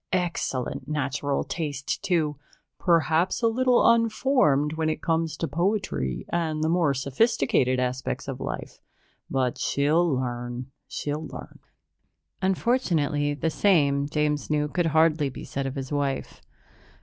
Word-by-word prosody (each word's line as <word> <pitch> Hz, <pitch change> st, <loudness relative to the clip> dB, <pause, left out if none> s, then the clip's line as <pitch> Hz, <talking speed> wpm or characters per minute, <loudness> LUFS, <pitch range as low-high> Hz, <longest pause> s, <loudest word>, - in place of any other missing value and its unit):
Excellent 170 Hz, -8 st, -2 dB
natural 145 Hz, -1 st, -1 dB
taste, 145 Hz, -2 st, -3 dB
too 165 Hz, -6 st, +1 dB, 0.4 s
perhaps 170 Hz, +3 st, +2 dB
a -, -, +6 dB
little 250 Hz, +2 st, +3 dB
unformed 230 Hz, -, +3 dB
when 160 Hz, 0 st, 0 dB
it 155 Hz, -, -2 dB
comes 165 Hz, -2 st, 0 dB
to -, -, -2 dB
poetry 145 Hz, -, -1 dB
and 160 Hz, -2 st, -1 dB
the 160 Hz, -, +1 dB
more 165 Hz, -3 st, +3 dB
sophisticated 135 Hz, -, +1 dB
aspects 125 Hz, 0 st, -2 dB
of -, -, -5 dB
life, -, -, -6 dB, 0.5 s
but 130 Hz, -2 st, 0 dB
she'll 155 Hz, +5 st, +2 dB
learn, 120 Hz, 0 st, -4 dB, 0.2 s
she'll 150 Hz, +2 st, -4 dB
learn." -, -, -10 dB, 0.8 s
Unfortunately, 170 Hz, -, +1 dB
the 160 Hz, +3 st, -1 dB
same, 145 Hz, -7 st, +2 dB
James 150 Hz, -1 st, 0 dB
knew, 150 Hz, -1 st, +1 dB
could 170 Hz, +3 st, 0 dB
hardly 160 Hz, -2 st, +3 dB
be -, -, -9 dB
said 135 Hz, 0 st, -3 dB
of 135 Hz, -, -5 dB
his 135 Hz, 0 st, -5 dB
wife. 140 Hz, -2 st, -2 dB
150 Hz, 130 wpm, -26 LUFS, 140-170 Hz, 0.8 s, a